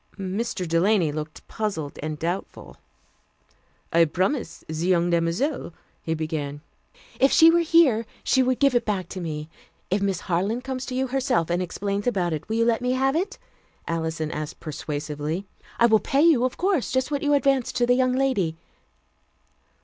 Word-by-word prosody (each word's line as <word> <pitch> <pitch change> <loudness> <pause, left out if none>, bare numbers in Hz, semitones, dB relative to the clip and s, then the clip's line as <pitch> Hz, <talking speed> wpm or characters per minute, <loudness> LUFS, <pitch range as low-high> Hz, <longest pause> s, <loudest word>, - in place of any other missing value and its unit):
Mr. 195 0 -3
Delany 170 0 +2
looked 155 +1 -7
puzzled 195 -10 -4
and 155 0 -4
doubtful. 175 +5 -5 1.2
"I 165 0 +6
promised 185 - -2
the 160 - -5
young 175 +1 +1
demoiselle 170 - -1
" - - -39
he 160 - -2
began. 150 -2 -4 0.6
"If 270 - +5
she 325 -1 +7
were 340 - +4
here, 310 -10 +4 0.2
she 260 - +3
would 255 -1 +1
give 275 -2 +3
it 240 -1 +2
back 195 -5 -2
to 185 - -6
me. 155 -2 -4 0.4
If 195 +1 +1
Miss 195 -1 0
Harland 195 +8 -1
comes 260 0 -4
to 255 - -4
you 260 +1 +1
herself 250 -11 0
and 175 +1 +1
explains 200 +4 -3
about 180 -8 0
it, 155 +5 -5
will 220 - -1
you 230 0 +2
let 230 0 +2
me 250 0 0
have 270 +2 +1
it?" 390 +6 -1 0.5
Alison 160 -1 -2
asked 150 0 -5
persuasively. 150 +3 -4 0.3
"I 235 - +5
will 220 -2 +5
pay 275 +6 +1
you, 300 -7 +5
of 255 - -3
course, 365 -7 +1
just 260 +2 0
what 285 -1 -1
you 290 -1 +3
advanced 275 -2 +1
to 240 - +2
the 245 - +4
young 255 0 +2
lady." 255 -12 +1
200 Hz, 180 wpm, -24 LUFS, 165-260 Hz, 1.2 s, she